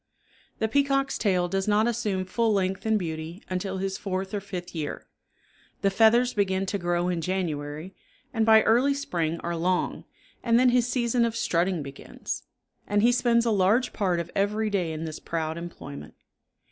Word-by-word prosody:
The 220 - 0
peacock's 275 +2 +1
tail 180 -4 +2
does 195 +2 -1
not 210 +1 +3
assume 215 -5 -1
full 225 +4 +1
length 195 +1 0
and 220 0 +3
beauty 165 0 -5
until 190 +1 -2
his 190 0 -3
fourth 190 0 -3
or 205 - 0
fifth 185 -3 -7
year. 155 -3 -4 0.8
The 195 - +3
feathers 235 +4 +4
begin 190 -2 +1
to 200 +1 -2
grow 175 0 0
in 175 -2 -1
January, 160 -1 -3 0.4
and 225 -2 +1
by 220 0 +6
early 255 +5 +3
spring 170 - -2
are 170 0 -3
long, 180 +2 -1 0.4
and 230 -1 +3
then 255 0 +5
his 245 -1 +3
season 240 -1 +1
of 230 -1 0
strutting 175 -3 0
begins; 140 0 -6 0.5
and 205 0 +2
he 240 - +6
spends 240 -1 +3
a 230 - +2
large 210 +5 +2
part 185 -5 0
of 170 0 -5
every 210 +2 0
day 180 -5 0
in 160 +1 -4
this 155 -1 -6
proud 160 -1 -3
employment. 120 - -8
195 Hz, 175 wpm, -26 LUFS, 175-225 Hz, 0.8 s, by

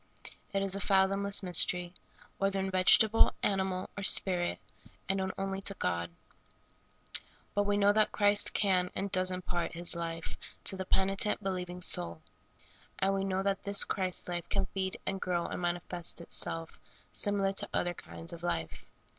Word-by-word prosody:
It 195 -1 0
is 195 -1 +1
a 200 - -2
fathomless 195 +1 +2
mystery, 180 -1 +3 0.5
whether 195 0 +1
in 190 0 -2
vegetable, 205 +4 +5
animal, 190 -2 0
or 200 - -5
spirit, 180 -2 +4 0.5
and 195 - +1
known 190 0 -1
only 195 0 -3
to 200 0 -1
God. 85 - -2 1.4
But 205 0 +1
we 205 0 +1
know 205 0 +4
that 215 0 +2
Christ 205 0 +3
can 185 -3 +1
and 195 +1 -3
does 185 -1 +1
impart 180 -1 -3
His 170 +1 -4
life 165 -1 -5 0.3
to 195 - +1
the 190 0 -5
penitent,, 195 +3 +1
believing 180 -2 -4
soul; 85 - -1 0.7
and 195 0 +1
we 195 0 -1
know 190 0 -1
that 195 -1 -1
this 200 0 +5
Christ 185 -2 -1
life 175 -1 -4
can 195 -1 0
feed 190 -1 -2
and 195 0 -3
grow 175 -2 -1
and - - -5
manifest 175 0 -1
itself 165 -1 0 0.3
similiar 200 -1 +1
to - - -2
other 175 0 -1
kinds 165 0 -8
of 170 - -9
life. 85 - -4
190 Hz, 165 wpm, -31 LUFS, 175-195 Hz, 1.4 s, vegetable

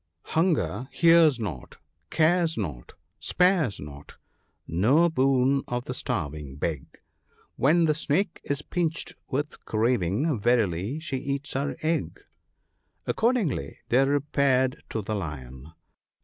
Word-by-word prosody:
— - - -58
" 85 - -53
Hunger 160 -6 +1
hears 165 -5 +5
not, 90 - -6 0.3
cares 165 +1 +2
not, 75 - -5 0.3
spares 180 - +2
not; 70 0 -10 0.5
no 130 - +3
boon 135 -2 +2
of 120 0 -3
the 125 - -4
starving 75 - -4
beg; 75 -1 -4 0.6
When 165 +5 +3
the 155 - +3
snake 160 +5 -1
is 140 +1 -3
pinched 165 -2 -2 0.2
with 145 +3 -3
craving, 115 - +1
verily 105 - +1
she 155 -4 -3
eats 140 +2 -3
her 140 +2 -2
egg." 155 - -1 0.9
Accordingly 230 - 0
they 130 +3 +4
repaired 140 -2 +1
to 110 - -3
the 110 - -3
Lion. 75 -6 -6
130 Hz, 120 wpm, -26 LUFS, 95-155 Hz, 0.9 s, hears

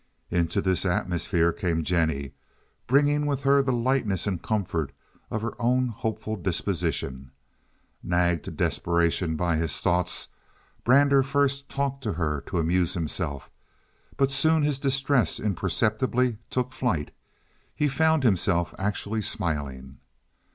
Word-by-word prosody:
Into 85 -1 +1
this 95 -1 +1
atmosphere 85 -2 +1
came 85 -3 -1
Jennie, 80 -5 0 0.5
bringing 145 +3 +3
with 140 -2 -1
her 140 0 +5
the 135 -1 0
lightness 120 -6 0
and 95 -5 -2
comfort 90 -8 -2 0.4
of 110 - -3
her 115 - -2
own 125 +1 +2
hopeful 110 -1 -3
disposition. 70 -8 -2 0.7
Nagged 85 -2 +1
to - - -4
desperation 85 -1 0
by 85 0 0
his 80 -3 0
thoughts, 90 0 0 0.5
Brander 140 +2 +5
first 140 +1 0
talked 140 -1 -2
to 105 - 0
her 75 -4 -1
to - - -3
amuse 85 +2 +1
himself; 80 -4 -3 0.7
but 135 0 +2
soon 160 +3 +3
his 145 -2 +1
distress 135 -2 +1
imperceptibly 110 +5 0
took 125 0 -2
flight; 100 - -1 0.6
he 150 - +1
found 160 +1 +2
himself 85 -5 +2
actually 105 +2 -2
smiling. 70 - -2
100 Hz, 125 wpm, -26 LUFS, 85-130 Hz, 0.7 s, her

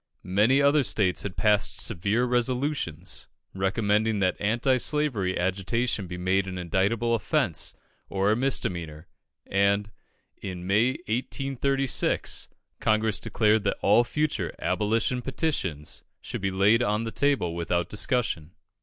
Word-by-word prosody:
Many 120 +8 +4
other 140 0 +4
states 100 -6 +1
had 100 -3 -6
passed 105 -1 +2
severe 105 +4 +1
resolutions, 125 - -1 0.3
recommending 105 +3 +1
that 95 -2 +1
anti 120 +5 +2
slavery 125 -9 0
agitation 95 +4 -1
be 90 0 -6
made 95 +2 +1
an 95 -1 -5
indictable 100 +7 0
offence, 115 - 0 0.3
or 100 +1 +1
a - - +3
misdemeanour; 85 - -1 0.4
and 100 +1 +1 0.5
in 90 -2 -6
May, 110 +7 +3
1836, 135 +2 -1 0.3
Congress 110 -1 +1
declared 110 -1 +2
that 100 - 0
all 105 +4 +5
future 150 +5 -2
"abolition 115 +4 0
petitions" 120 - -2 0.2
should - - -6
be 95 - 0
laid 100 +5 +3
on 105 -1 0
the 115 - -4
table 135 -13 +1
without 85 +1 -1
discussion. 100 -7 -1
105 Hz, 125 wpm, -26 LUFS, 95-125 Hz, 0.5 s, all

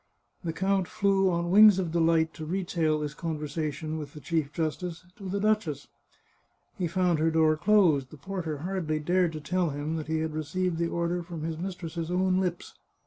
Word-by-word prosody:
The 165 - -1
count 190 +1 0
flew 195 -2 +2
on 170 0 -1
wings 210 0 +8
of 180 -4 -1
delight 165 -1 +2
to 155 - -8
retail 170 -2 0
this 150 -1 -3
con 165 -1 -3
versation 155 +1 -3
with 145 -2 -8
the - - -7
chief 155 -2 -1
justice 165 +3 -3
to 195 -3 -7
the 200 +2 -1
duchess. 200 -9 0 0.9
He 180 - -1
found 175 -1 +1
her 160 +1 +3
door 160 -1 +3
closed; 165 -7 +3
the 155 - -12
porter 165 0 -4
hardly 180 -5 -1
dared 175 +2 +2
to 155 - -5
tell 180 +3 0
him 145 +3 -3
that 155 - -5
he 160 0 0
had 160 -1 -2
received 170 +3 -2
the 170 - +1
order 170 +1 -1
from 170 -2 -7
his 160 0 -3
mistress's 170 -3 -5
own 185 +1 +2
lips. 180 -2 -3
170 Hz, 195 wpm, -28 LUFS, 155-185 Hz, 0.9 s, wings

